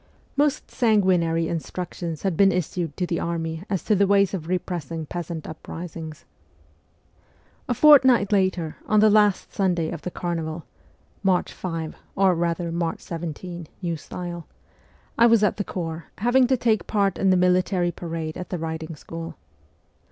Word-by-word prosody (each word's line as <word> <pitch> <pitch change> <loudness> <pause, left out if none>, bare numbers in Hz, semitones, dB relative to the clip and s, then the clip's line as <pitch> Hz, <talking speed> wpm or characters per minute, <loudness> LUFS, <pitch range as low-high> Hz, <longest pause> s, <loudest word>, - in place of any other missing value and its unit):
Most 290 0 +1
sanguinary 185 -8 +2
instructions 170 -1 -4
had 190 -4 0
been 195 +3 +5
issued 175 -3 -2
to 180 - 0
the 170 -1 -2
army 165 -1 -3
as 190 -3 -1
to 215 - +2
the 200 0 +3
ways 200 -1 +3
of 165 -5 -4
repressing 170 -3 -3
peasant 170 0 -5
uprisings. 160 0 -8 1.4
A 245 - +1
fortnight 260 -8 +6
later, 185 -5 +1
on 215 - +4
the 215 0 +6
last 210 -2 +3
Sunday 175 -5 0
of 170 -3 -6
the - - -4
carnival 165 -3 -4 0.6
(March 190 -2 +1
5, 165 -3 -4 0.2
or 190 -1 +4
rather 170 0 -1
March 170 -1 -2
17, 170 +1 -6 0.2
new 170 -1 -1
style), 175 +2 -7 0.7
I 235 - +8
was 230 -2 +5
at 210 - +2
the 205 - -1
corps, 165 -3 -5
having 245 +4 +4
to 260 0 +2
take 220 -6 +1
part 200 -3 +1
in 195 - +3
the 185 - +5
military 180 0 +2
parade 165 -2 -5
at 180 - -6
the 180 - -2
riding 160 0 -5
school. 165 +2 -8
175 Hz, 155 wpm, -24 LUFS, 165-195 Hz, 1.4 s, I